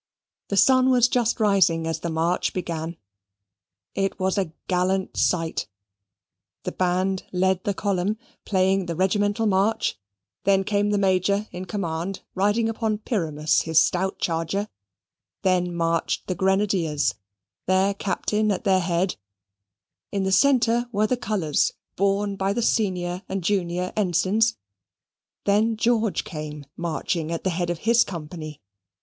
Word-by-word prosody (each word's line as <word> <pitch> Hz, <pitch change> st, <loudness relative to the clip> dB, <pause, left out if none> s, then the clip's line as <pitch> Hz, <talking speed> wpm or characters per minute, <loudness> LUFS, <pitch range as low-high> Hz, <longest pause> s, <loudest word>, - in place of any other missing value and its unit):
The 200 Hz, -, -2 dB
sun 260 Hz, +3 st, +5 dB
was 245 Hz, -2 st, +5 dB
just 240 Hz, -2 st, +1 dB
rising 190 Hz, -6 st, +3 dB
as 165 Hz, -1 st, -2 dB
the 170 Hz, -, -3 dB
march 165 Hz, +2 st, 0 dB
began 170 Hz, -2 st, -4 dB, 1.0 s
it 195 Hz, 0 st, -1 dB
was 190 Hz, 0 st, +1 dB
a 190 Hz, -6 st, -1 dB, 0.2 s
gallant 185 Hz, +1 st, 0 dB
sight 165 Hz, -3 st, 0 dB, 1.0 s
the -, -, -3 dB
band 185 Hz, +1 st, 0 dB
led 190 Hz, 0 st, +1 dB
the 200 Hz, -, 0 dB
column, 200 Hz, +1 st, 0 dB, 0.3 s
playing 190 Hz, -1 st, +1 dB
the 170 Hz, -, -3 dB
regimental 205 Hz, +4 st, +1 dB
march 205 Hz, -, +1 dB, 0.4 s
then 195 Hz, 0 st, +3 dB
came 205 Hz, +1 st, +1 dB
the 205 Hz, -, +1 dB
Major 200 Hz, +2 st, +1 dB
in 180 Hz, +1 st, -6 dB
command, 185 Hz, -2 st, -3 dB
riding 205 Hz, +4 st, +2 dB
upon 220 Hz, -1 st, -1 dB
Pyramus, 160 Hz, -, 0 dB
his 160 Hz, -1 st, +3 dB
stout 190 Hz, +2 st, -1 dB
charger 170 Hz, +5 st, -1 dB, 0.7 s
then 180 Hz, -1 st, +2 dB
marched 165 Hz, -1 st, -1 dB
the 185 Hz, -, -2 dB
grenadiers, 190 Hz, -5 st, +1 dB, 0.5 s
their 190 Hz, +2 st, +3 dB
Captain 210 Hz, +2 st, 0 dB
at 190 Hz, -, -2 dB
their 190 Hz, -3 st, +3 dB
head; 175 Hz, +1 st, 0 dB, 0.9 s
in 200 Hz, -2 st, -1 dB
the 190 Hz, -, 0 dB
centre 240 Hz, +1 st, +3 dB
were 210 Hz, -1 st, +2 dB
the 255 Hz, -, +1 dB
colours, 200 Hz, -, 0 dB, 0.2 s
borne 200 Hz, +1 st, +1 dB
by 195 Hz, +1 st, 0 dB
the 235 Hz, -, -1 dB
senior 180 Hz, -5 st, 0 dB
and 190 Hz, -1 st, -3 dB
junior 180 Hz, -1 st, -1 dB
Ensigns 200 Hz, +3 st, +2 dB, 0.9 s
then 215 Hz, +2 st, +2 dB
George 225 Hz, -2 st, +1 dB
came 150 Hz, -2 st, -7 dB
marching 165 Hz, -1 st, -2 dB
at 165 Hz, -, -3 dB
the 185 Hz, -, +1 dB
head 175 Hz, 0 st, -2 dB
of 175 Hz, -, -1 dB
his 235 Hz, +1 st, +5 dB
company. 155 Hz, -, -8 dB
190 Hz, 140 wpm, -24 LUFS, 175-205 Hz, 1.0 s, sun